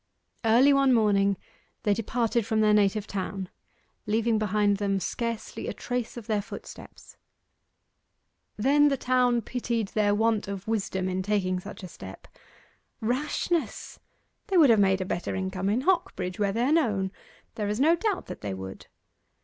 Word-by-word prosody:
Early 240 Hz, +6 st, +5 dB
one 275 Hz, -1 st, +4 dB
morning 200 Hz, -3 st, +3 dB, 0.5 s
they 205 Hz, -, +3 dB
departed 230 Hz, +2 st, 0 dB
from 220 Hz, +1 st, 0 dB
their 210 Hz, -1 st, +4 dB
native 210 Hz, 0 st, +2 dB
town, 195 Hz, -1 st, -4 dB, 0.6 s
leaving 225 Hz, +1 st, +1 dB
behind 205 Hz, -1 st, +2 dB
them 200 Hz, -1 st, 0 dB
scarcely 230 Hz, +3 st, -4 dB
a -, -, -3 dB
trace 245 Hz, -1 st, -4 dB
of 235 Hz, -, -7 dB
their 210 Hz, -1 st, 0 dB
footsteps. 205 Hz, -, -11 dB, 1.4 s
Then 285 Hz, +6 st, +4 dB
the 275 Hz, -1 st, +1 dB
town 250 Hz, -2 st, +2 dB
pitied 230 Hz, -3 st, -2 dB
their 205 Hz, -1 st, +2 dB
want 220 Hz, -1 st, +1 dB
of 200 Hz, 0 st, -6 dB
wisdom 195 Hz, -4 st, -1 dB
in 185 Hz, 0 st, -1 dB
taking 185 Hz, -2 st, 0 dB
such 185 Hz, -, -10 dB
a -, -, -5 dB
step. 95 Hz, -, -11 dB, 0.7 s
'Rashness; 295 Hz, +8 st, -2 dB, 0.5 s
they 390 Hz, -3 st, +1 dB
would 295 Hz, -7 st, +7 dB
have 220 Hz, -, +5 dB
made 190 Hz, -1 st, +3 dB
a -, -, -2 dB
better 175 Hz, -1 st, -3 dB
income 190 Hz, 0 st, -2 dB
in 225 Hz, +5 st, +1 dB
Hocbridge, 205 Hz, -, 0 dB
where 200 Hz, -1 st, +2 dB
they 230 Hz, +4 st, 0 dB
are 270 Hz, -, +2 dB
known! 210 Hz, -, +1 dB, 0.4 s
There 210 Hz, -2 st, -3 dB
is 210 Hz, +2 st, -2 dB
no 320 Hz, +5 st, +5 dB
doubt 410 Hz, +1 st, -1 dB
that -, -, -8 dB
they 100 Hz, -2 st, -4 dB
would. 95 Hz, 0 st, -8 dB
215 Hz, 160 wpm, -27 LUFS, 195-245 Hz, 1.4 s, would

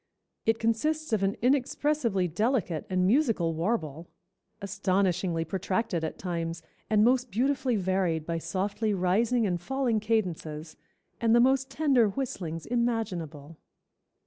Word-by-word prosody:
It 225 Hz, 0 st, +3 dB
consists 280 Hz, +6 st, 0 dB
of 215 Hz, -, +2 dB
an 195 Hz, +1 st, +1 dB
inexpressibly 255 Hz, -6 st, +1 dB
delicate 190 Hz, -, -1 dB
and 185 Hz, -1 st, +1 dB
musical 220 Hz, -, +2 dB
warble, 165 Hz, -3 st, -2 dB, 0.5 s
astonishingly 185 Hz, -4 st, 0 dB
protracted 185 Hz, 0 st, -2 dB
at 160 Hz, -, -4 dB
times, 170 Hz, -2 st, -4 dB, 0.3 s
and 215 Hz, -1 st, +4 dB
most 250 Hz, +1 st, +3 dB
beautifully 255 Hz, +3 st, +1 dB
varied 185 Hz, -5 st, 0 dB
by 165 Hz, 0 st, -2 dB
softly 200 Hz, +4 st, -1 dB
rising 215 Hz, +6 st, +2 dB
and 175 Hz, -3 st, -1 dB
falling 260 Hz, 0 st, 0 dB
cadences, 170 Hz, -8 st, -2 dB, 0.4 s
and 230 Hz, 0 st, +3 dB
the -, -, +6 dB
most 265 Hz, +2 st, +3 dB
tender 270 Hz, -6 st, +3 dB
whistlings 180 Hz, -, -4 dB
imaginable." 180 Hz, -11 st, -2 dB
200 Hz, 120 wpm, -28 LUFS, 170-240 Hz, 0.5 s, the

